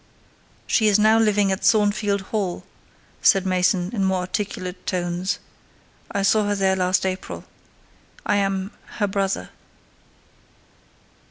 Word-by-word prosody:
"She 220 - +2
is 210 -1 +5
now 215 +1 +5
living 205 -3 +3
at 190 - -2
Thornfield 205 -2 +2
Hall," 195 -5 -2 0.6
said 195 -3 +4
Mason, 185 0 +1
in 200 -4 0
more 190 -1 +1
articulate 185 -1 -4
tones: 180 0 -1 0.7
"I 200 -2 -1
saw 210 +1 +3
her 205 - +1
there 190 -1 +2
last 185 +1 +1
April. 185 0 -4 0.8
I 205 - +2
am 195 0 -1 0.3
her 210 - +2
brother." 195 -1 -2
195 Hz, 120 wpm, -23 LUFS, 185-205 Hz, 0.8 s, is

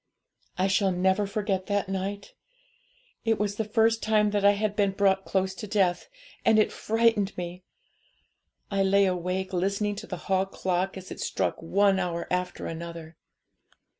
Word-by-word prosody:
'I 185 - +2
shall 190 0 +2
never 190 +3 +1
forget 195 -2 -2
that 205 -1 0
night. 195 +1 -4 0.9
It 225 -1 +2
was 205 -1 -2
the 220 - 0
first 225 +1 +2
time 210 -1 +2
that 205 -1 0
I 200 0 +6
had 205 0 -1
been 200 -2 +2
brought 195 -1 +2
close 190 -1 0
to 210 - -7
death, 190 -4 +1 0.3
and 220 - +4
it 215 - +3
frightened 225 -3 +1
me. 175 0 -5 1.1
I 195 0 +1
lay 195 +1 +4
awake, 185 +1 -2
listening 200 +3 0
to - - -7
the 180 - -5
hall 190 0 +1
clock 190 0 -2
as 185 0 -10
it - - -7
struck - - -2
one 195 +3 +3
hour 170 -2 -2
after 180 0 -2
another. 165 0 -7
195 Hz, 165 wpm, -27 LUFS, 185-205 Hz, 1.1 s, I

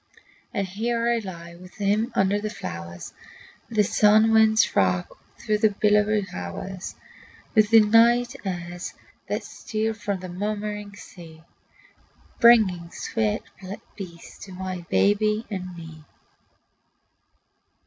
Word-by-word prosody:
And 200 - -1
here 230 +5 -1
I 235 - +1
lie 170 -5 -8
with 180 +1 -14
him 210 +4 0
under 195 +2 +2
the 215 - -3
flowers 85 - -7 0.6
That 215 -2 +2
sun 215 +2 +4
winds 220 0 +4
rock 90 -1 +1 0.2
through 210 -1 -1
the 220 0 +4
billowy 210 0 +3
hours, 175 - -6 0.6
With 215 -2 +4
the 225 -1 +8
night 235 +4 +4
airs 175 -2 -5 0.3
that - - -2
steal 220 0 -3
from 205 -3 -3
the 185 - -6
murmuring 210 +2 -4
sea, 165 -5 -13 1.0
Bringing 200 -8 +5
sweet 215 +3 -2 0.5
peace 170 -4 -10
to 195 - -10
my 185 -2 -6
baby 210 +2 +2
and 185 -3 -5
me. 160 -2 -11
205 Hz, 120 wpm, -24 LUFS, 180-215 Hz, 1.0 s, the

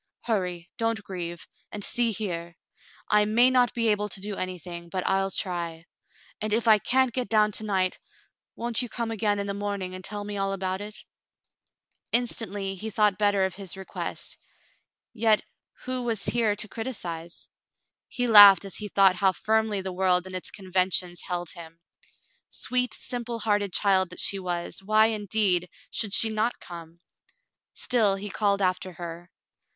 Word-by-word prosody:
Hurry, 180 -6 -2
don't 225 -1 -1
grieve 175 -4 -6
— - - -37
and 205 - -6
see 240 +2 +1
here: 175 -5 -4 0.5
I 210 0 +5
may 235 +4 +4
not 250 -1 +3
be 230 -1 +1
able 210 0 0
to 195 - -2
do 205 +1 -5
anything, 175 -2 -6
but 185 +1 -3
I'll 195 0 +1
try; 170 -4 -3 0.6
and 215 0 -2
if 230 +2 +1
I 215 -1 +7
can't 260 +2 +2
get 250 0 -2
down 215 -1 +3
to 220 - 0
night, 190 -3 0 0.6
won't 235 0 -2
you 245 - -4
come 230 -1 -3
again 210 -2 0
in 200 - -2
the 200 - -3
morning 200 -2 -4
and 185 0 -8
tell 205 +2 -3
me 205 0 -5
all 195 0 -1
about 190 0 -2
it.? 210 +1 -8 0.6
" - - -47
Instantly 205 -5 -3
he 215 +4 -6
thought 210 -2 +2
better 205 -2 +3
of 190 - -3
his 195 -1 -7
request, 190 - -6 0.7
yet 220 -2 +3 0.4
who 255 0 -2
was 230 -4 -2
here 225 -3 +2
to 210 +1 -3
criticise? 175 -8 -6 0.6
He 245 - -2
laughed 205 -4 +9
as 195 - -6
he 210 - -4
thought 195 -2 +4
how 190 0 +4
firmly 220 0 0
the 190 -1 -5
world 180 -1 +2
and 185 0 -8
its 185 - -4
conventions 185 -2 -1
held 175 -2 -3
him. 165 -1 -11 0.7
Sweet, 250 -2 0
simple 240 -1 -4
hearted 205 -3 0
child 190 -1 +2
that 180 - -9
she 195 - +3
was, 175 0 -3
why, 215 +2 +4
indeed, 200 -4 +1 0.2
should 210 -3 0
she 225 - +5
not 220 +2 -1
come 165 -2 -10
.^ - - -31 0.8
Still 220 -6 +2
he 200 +1 -6
called 200 -1 +1
after 185 0 -1
her. 170 0 -8
200 Hz, 175 wpm, -26 LUFS, 185-220 Hz, 0.8 s, laughed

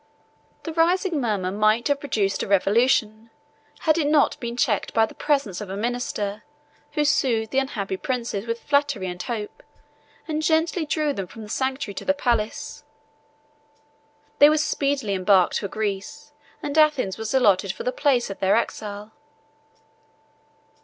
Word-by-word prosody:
The 325 - -5
rising 340 0 +2
murmur 200 -6 -1
might 215 +3 +2
have 285 -1 +1
produced 215 -9 -1
a - - -3
revolution, 220 +2 +2 0.5
had 320 0 +2
it 295 - +1
not 295 -1 +3
been 235 -1 -5
checked 215 -4 0
by 225 -1 +5
the - - -12
presence 275 - -1
of 205 - -7
a 195 - -4
minister, 215 -3 -3 0.5
who 300 - +1
soothed 240 -6 +1
the 270 - +2
unhappy 200 -8 -3
princes 235 -3 -3
with 230 0 -3
flattery 285 -8 +1
and 180 -1 -5
hope, 215 -2 -5 0.7
and 310 -1 -2
gently 320 +1 +1
drew 305 -1 0
them 195 -7 -5
from 225 +3 -11
the 210 - -11
sanctuary 260 -2 -2
to - - -7
the 285 - +2
palace. 235 -6 -2 1.6
They 290 - +9
were 310 - +3
speedily 280 -7 0
embarked 185 -1 +3
for 200 - -4
Greece, 215 +9 -5 0.3
and 290 +2 0
Athens 280 -11 +2
was 220 +3 -3
allotted 200 -6 +3
for - - -8
the 250 - 0
place 255 -6 +1
of 195 - -8
their 190 0 +3
exile. 210 -2 -3
235 Hz, 155 wpm, -24 LUFS, 205-285 Hz, 1.6 s, They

